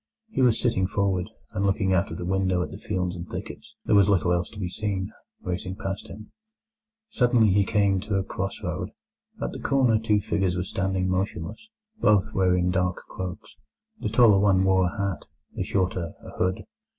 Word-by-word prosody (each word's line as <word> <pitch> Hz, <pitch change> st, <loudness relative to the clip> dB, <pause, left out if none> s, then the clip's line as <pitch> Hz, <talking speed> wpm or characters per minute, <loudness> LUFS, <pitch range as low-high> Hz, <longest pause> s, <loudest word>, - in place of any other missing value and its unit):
He 175 Hz, -, -1 dB
was 125 Hz, -3 st, +4 dB
sitting 95 Hz, -6 st, +1 dB
forward, 95 Hz, -2 st, 0 dB, 0.2 s
and 95 Hz, -, -2 dB
looking 95 Hz, -1 st, +2 dB
out 95 Hz, -, +2 dB
of 80 Hz, -, -6 dB
the 85 Hz, -, -5 dB
window 95 Hz, -1 st, +1 dB
at 75 Hz, -, -7 dB
the -, -, -8 dB
fields 90 Hz, -3 st, -2 dB
and 85 Hz, +1 st, -7 dB
thickets—there -, -, -5 dB
was 100 Hz, -1 st, +6 dB
little 90 Hz, -3 st, +3 dB
else 85 Hz, 0 st, 0 dB
to 110 Hz, -, -13 dB
be 95 Hz, -, -2 dB
seen—racing 95 Hz, -2 st, -4 dB
past 95 Hz, 0 st, -5 dB
him. 110 Hz, -, -11 dB, 0.8 s
Suddenly 120 Hz, -, +3 dB
he 100 Hz, +1 st, +4 dB
came 100 Hz, -1 st, +2 dB
to 105 Hz, +1 st, -3 dB
a 95 Hz, -, +1 dB
cross 95 Hz, +1 st, -4 dB
road. -, -, -3 dB, 0.5 s
At -, -, -2 dB
the -, -, -7 dB
corner 125 Hz, -5 st, +3 dB
two 110 Hz, -2 st, +2 dB
figures 95 Hz, -3 st, 0 dB
were 90 Hz, -, -1 dB
standing 95 Hz, 0 st, -1 dB
motionless; 95 Hz, -, -3 dB, 0.3 s
both 105 Hz, -, +3 dB
were 95 Hz, -1 st, +3 dB
in 90 Hz, 0 st, +1 dB
dark 90 Hz, 0 st, +1 dB
cloaks; 90 Hz, -1 st, -7 dB, 0.4 s
the -, -, -2 dB
taller 110 Hz, -3 st, +6 dB
one 95 Hz, -2 st, +4 dB
wore 95 Hz, -1 st, +4 dB
a 90 Hz, -, -6 dB
hat, 100 Hz, -3 st, -2 dB, 0.3 s
the -, -, -2 dB
shorter 90 Hz, -3 st, -1 dB
a -, -, -9 dB
hood. 95 Hz, +1 st, -1 dB
95 Hz, 185 wpm, -26 LUFS, 90-105 Hz, 0.8 s, was